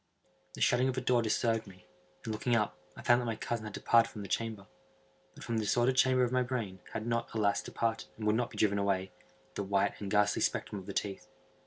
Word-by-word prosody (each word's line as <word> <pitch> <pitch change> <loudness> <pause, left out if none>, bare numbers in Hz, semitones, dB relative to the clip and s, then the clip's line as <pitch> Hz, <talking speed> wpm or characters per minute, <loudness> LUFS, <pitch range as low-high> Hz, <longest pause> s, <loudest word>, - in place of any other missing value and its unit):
The - - -9
shutting 125 +2 +3
of 130 - -3
a - - 0
door 125 -1 +3
disturbed 115 0 0
me, 95 -2 -15 0.4
and, 110 - -2
looking 120 +3 +1
up, 105 -2 +1 0.2
I - - -10
found 120 0 +5
that 120 - -3
my 115 - -1
cousin 115 0 -3
had 105 - -7
departed 115 +2 +4
from 105 - -8
the - - -6
chamber. 110 -3 -2 0.7
But - - -11
from 115 - -2
the 110 - 0
disordered 120 +4 +2
chamber 130 -1 +4
of 125 - +1
my 130 0 +2
brain, 115 -7 -3
had 110 - -3
not, 115 0 -1
alas! 100 -2 +2
departed, 115 -1 -2
and 110 - -5
would 105 0 +3
not 120 +1 0
be - - -12
driven 100 -1 +2
away, 95 -1 0 0.4
the - - -3
white 100 +1 0
and 100 - -4
ghastly 105 0 +2
spectrum 105 - -1
of 95 - -12
the 100 - -5
teeth. 100 -1 -3
110 Hz, 235 wpm, -32 LUFS, 100-120 Hz, 0.7 s, found